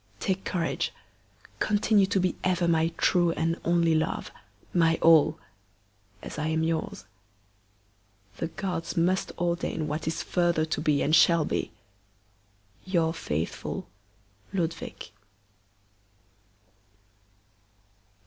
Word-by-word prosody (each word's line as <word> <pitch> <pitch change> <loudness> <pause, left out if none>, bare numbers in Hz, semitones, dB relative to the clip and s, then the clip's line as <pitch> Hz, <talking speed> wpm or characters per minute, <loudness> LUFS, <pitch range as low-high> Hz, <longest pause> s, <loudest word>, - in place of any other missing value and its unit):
Take 190 0 -2
courage! 170 -2 -1 0.7
Continue 205 -1 +3
to 195 0 +1
be 185 -1 0
ever 180 -2 +1
my 165 -1 +3
true 175 -2 +3
and 165 +1 -1
only 170 -1 +3
love, 160 0 -1 0.4
my 165 -2 +3
all! 160 -2 +5 0.9
as - - -7
I 155 - -1
am 160 0 0
yours. 165 +5 -2 1.3
The 165 - -2
gods 175 -2 -4
must 180 +3 +1
ordain 170 -2 -1
what 155 +2 -3
is 160 - -2
further 170 -3 +1
to 160 - -2
be 150 -2 +2
and 155 - +3
shall 170 -3 +5
be! - - -2 1.1
Your 170 -4 +1
faithful 80 - -4 0.7
LUDWIG. 165 -3 -4
165 Hz, 105 wpm, -27 LUFS, 160-180 Hz, 1.3 s, all